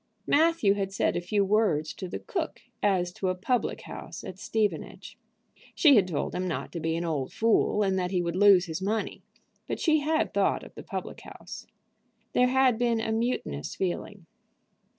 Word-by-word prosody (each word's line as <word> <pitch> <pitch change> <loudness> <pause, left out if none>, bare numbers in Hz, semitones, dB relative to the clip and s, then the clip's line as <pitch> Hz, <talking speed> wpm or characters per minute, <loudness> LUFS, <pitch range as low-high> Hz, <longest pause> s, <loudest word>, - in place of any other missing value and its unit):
Matthew 315 -9 +3
had 195 -1 -2
said 195 - 0
a 175 - -1
few 200 +3 +1
words 190 -7 +1
to 185 - -6
the - - -5
cook 345 -5 -4 0.2
as 180 -3 +1
to 185 - -2
a 185 - 0
public 240 +7 -1
house - - -8
at 185 - -8
Stevenage. 215 0 -2 0.6
She 290 -4 +6
had 195 -5 +4
told 160 -6 -2
him 185 +1 -2
not 170 - -4
to 170 - -5
be 160 0 -1
an 170 +1 -2
old 145 -6 -2
fool, 220 -1 +2
and 190 -1 +1
that 180 -1 -1
he 185 -1 0
would 170 -1 -2
lose 195 -2 +6
his 165 +1 -5
money, 210 +3 -2 0.5
but - - -3
she 310 -2 +3
had 310 +2 0
thought - - +1
of - - -12
the - - -9
public - - -6
house. - - -10 0.7
There 250 - +4
had 255 -2 +3
been 235 -2 +2
a 225 0 -2
mutinous 220 - -2
feeling. 190 0 -4
195 Hz, 190 wpm, -28 LUFS, 180-230 Hz, 0.7 s, She